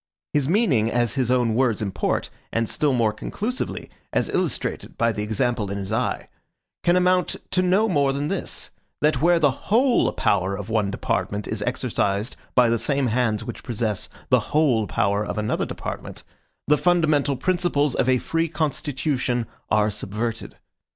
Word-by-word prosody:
His 145 Hz, -1 st, +1 dB
meaning, 165 Hz, -, +3 dB
as 120 Hz, -1 st, +1 dB
his 130 Hz, -3 st, 0 dB
own 125 Hz, -3 st, +2 dB
words 120 Hz, -2 st, +2 dB
import, 100 Hz, -3 st, -1 dB, 0.2 s
and 115 Hz, 0 st, 0 dB
still 150 Hz, +3 st, +1 dB
more 115 Hz, -4 st, +2 dB
conclusively 220 Hz, -, -4 dB, 0.2 s
as -, -, 0 dB
illustrated -, -, -2 dB
by 115 Hz, 0 st, +2 dB
the 105 Hz, -1 st, -4 dB
example 110 Hz, 0 st, -1 dB
in 100 Hz, -, -3 dB
his 100 Hz, -1 st, -5 dB
eye, -, -, -1 dB, 0.6 s
can 175 Hz, -, +4 dB
amount 180 Hz, 0 st, +2 dB, 0.2 s
to 185 Hz, -, +3 dB
no 190 Hz, +4 st, +3 dB
more 145 Hz, -8 st, +2 dB
than 140 Hz, +2 st, -2 dB
this, -, -, -4 dB, 0.3 s
that 150 Hz, +1 st, +2 dB
where 175 Hz, +2 st, +5 dB
the 150 Hz, -4 st, +4 dB
WHOLE 235 Hz, -, +2 dB
power 100 Hz, 0 st, +1 dB
of 105 Hz, +2 st, -6 dB
one 105 Hz, -3 st, +1 dB
department 100 Hz, +1 st, -2 dB
is 110 Hz, -1 st, -3 dB
exercised 115 Hz, -3 st, -1 dB, 0.2 s
by 125 Hz, -2 st, +6 dB
the 115 Hz, 0 st, +1 dB
same 140 Hz, -2 st, +1 dB
hands 115 Hz, -4 st, +1 dB
which -, -, -7 dB
possess 110 Hz, -5 st, -2 dB, 0.2 s
the -, -, +5 dB
WHOLE 130 Hz, -9 st, +2 dB
power 100 Hz, +5 st, +1 dB
of 105 Hz, -, -4 dB
another 105 Hz, 0 st, -1 dB
department, -, -, -6 dB, 0.4 s
the 150 Hz, 0 st, +4 dB
fundamental 155 Hz, -6 st, +2 dB
principles 170 Hz, -3 st, +1 dB
of 130 Hz, -, +1 dB
a 130 Hz, -, +4 dB
free 165 Hz, +6 st, -1 dB
constitution 140 Hz, -5 st, -1 dB, 0.2 s
are 105 Hz, 0 st, +3 dB
subverted. 105 Hz, +3 st, -4 dB
125 Hz, 165 wpm, -23 LUFS, 110-155 Hz, 0.6 s, by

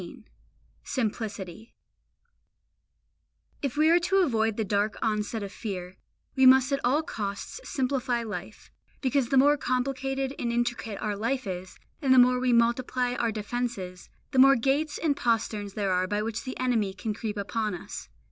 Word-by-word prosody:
XVII -, -, -10 dB, 0.6 s
SIMPLICITY 215 Hz, -3 st, -4 dB, 1.9 s
If 275 Hz, -1 st, -3 dB
we 310 Hz, +2 st, +5 dB
are 345 Hz, -, +6 dB
to 385 Hz, +2 st, +3 dB
avoid 225 Hz, -7 st, +1 dB
the 220 Hz, -, +1 dB
dark 205 Hz, +2 st, 0 dB
onset 215 Hz, 0 st, -1 dB
of 200 Hz, -, -6 dB
fear, 185 Hz, -5 st, -6 dB, 0.4 s
we 265 Hz, -1 st, +6 dB
must 260 Hz, +1 st, +6 dB
at 275 Hz, -, +1 dB
all 280 Hz, +6 st, +2 dB
costs 200 Hz, -, -5 dB
simplify 255 Hz, -3 st, -1 dB
life, 215 Hz, -2 st, -7 dB, 0.3 s
because 260 Hz, -2 st, +1 dB
the 270 Hz, -, +3 dB
more 290 Hz, +3 st, +6 dB
complicated 270 Hz, +1 st, -1 dB
and 235 Hz, -, -1 dB
intricate 240 Hz, -3 st, -2 dB
our 210 Hz, -1 st, -1 dB
life 245 Hz, +5 st, -1 dB
is, 185 Hz, -1 st, -6 dB, 0.2 s
and 265 Hz, -3 st, +4 dB
the -, -, +5 dB
more 250 Hz, 0 st, +6 dB
we 255 Hz, 0 st, +1 dB
multiply 245 Hz, +1 st, +2 dB
our 235 Hz, -2 st, 0 dB
defences, 210 Hz, -4 st, -4 dB, 0.2 s
the 265 Hz, -, +2 dB
more 275 Hz, +1 st, +8 dB
gates 275 Hz, +5 st, 0 dB
and 305 Hz, -4 st, +1 dB
posterns 220 Hz, -4 st, -1 dB
there 200 Hz, -3 st, 0 dB
are 185 Hz, 0 st, +1 dB
by 205 Hz, +2 st, -1 dB
which 225 Hz, +2 st, -4 dB
the 260 Hz, -, -6 dB
enemy 225 Hz, -7 st, 0 dB
can 215 Hz, +2 st, -3 dB
creep 210 Hz, -1 st, -4 dB
upon 210 Hz, 0 st, -2 dB
us. 175 Hz, -, -8 dB
235 Hz, 165 wpm, -27 LUFS, 210-265 Hz, 1.9 s, more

